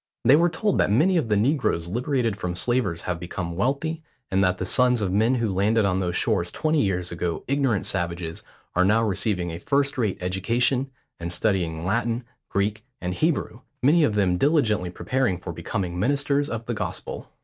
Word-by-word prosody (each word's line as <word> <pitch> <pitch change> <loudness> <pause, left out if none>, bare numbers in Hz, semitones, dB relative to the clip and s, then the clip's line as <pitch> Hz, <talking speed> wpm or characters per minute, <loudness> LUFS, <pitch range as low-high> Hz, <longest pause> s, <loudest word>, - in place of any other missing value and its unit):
They 130 +5 +7
were 170 +3 +4
told 205 +4 0
that - - +3
many 155 - +3
of 155 -10 +1
the 105 - +3
negroes 120 - +1
liberated 120 +2 0
from 90 -2 -4
slavers 105 -5 0
have 90 -2 -3
become 85 -1 -5
wealthy, 140 - -1 0.3
and 95 +1 +3
that 90 -1 +2
the 90 - -3
sons 125 +4 +3
of 100 -3 -1
men 110 +6 +3
who 115 -5 0
landed 105 +3 +2
on 95 -1 +1
those 90 -2 -1
shores 85 0 +1
twenty 155 - +1
years 90 -3 -1
ago 85 -1 -3
ignorant 135 -7 +1
savages, 85 -2 -3 0.3
are 90 - +3
now 105 +4 +3
receiving 95 -4 0
a 85 - -6
first 140 +4 0
rate 105 -5 0
education, 115 +9 0 0.3
and 85 0 -4
studying 85 -5 0
Latin, 115 +4 0 0.3
Greek, 105 +2 -1 0.2
and 90 0 -3
Hebrew, 145 - -1 0.2
many 155 +5 +5
of 110 -8 +2
them 90 -3 +2
diligently 115 - +2
preparing 125 +1 -1
for 90 -1 -7
becoming 90 +1 -3
ministers 140 +5 +1
of 115 0 -4
the 120 - -2
gospel. 110 - -5
105 Hz, 185 wpm, -24 LUFS, 90-130 Hz, 0.3 s, They